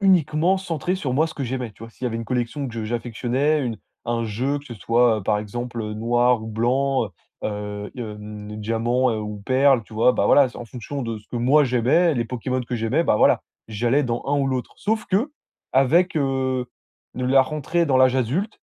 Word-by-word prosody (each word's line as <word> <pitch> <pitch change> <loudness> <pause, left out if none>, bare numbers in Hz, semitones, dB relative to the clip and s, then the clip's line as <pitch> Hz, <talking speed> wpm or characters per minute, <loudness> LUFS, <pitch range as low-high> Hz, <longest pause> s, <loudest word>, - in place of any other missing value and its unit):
uniquement 180 -2 +3
centré 175 -1 -2
sur 140 -9 -3
moi, 155 +4 +3
ce 160 - -9
que 140 - -3
j'aimais, 125 -1 -3
tu 105 - -16
vois? 115 - -11
S'il 120 - -9
y - - +2
avait 115 - -3
une 115 - -4
collection 125 +4 -2
que - - -9
je 115 -1 -3
j'affectionnais, 120 +6 0
une 120 -4 -2 0.3
un 115 0 0
jeu 125 +7 -1
que 140 - -14
ce 120 - -8
soit, 115 +1 +2
heu, - - -7
par 105 +2 +1
exemple, 120 +3 -5
heu, 105 0 -4
noir 120 +1 +2
ou - - -7
blanc, 125 +3 +1
heu, - - -13 0.3
heu, 105 0 -4
hem, 105 -2 -7
diamant, 115 +4 +1
heu, 110 - -2
ou 105 0 -5
perle, 130 0 +4
tu 110 - -18
vois? 115 +3 +4
Bah, - - 0
voilà, 140 -2 +6
c'est 125 - -13
en 120 - -6
fonction 130 +4 -6
de 115 -2 -4
ce 105 - -21
que - - -5
moi 130 +6 +4
j'aimais, 130 +7 +3
les 120 -3 0
Pokémon 125 +2 -2
que 125 - -5
j'aimais, 120 +9 +1
bah, - - +3
voilà. - - +4 0.3
J'allais 120 +6 +1
dans 120 -1 -2
un 145 +1 +1
ou 140 - +1
l'autre. 130 -2 -2
Sauf 220 +1 -1
qu'avec, 180 - 0
heu, 130 -3 0 0.5
de 125 - -3
la 135 +1 +6
rentrée 155 +4 -1
dans 135 -3 +3
l'âge 130 0 +5
adulte, 155 - -1
125 Hz, 220 wpm, -23 LUFS, 115-140 Hz, 0.5 s, voilà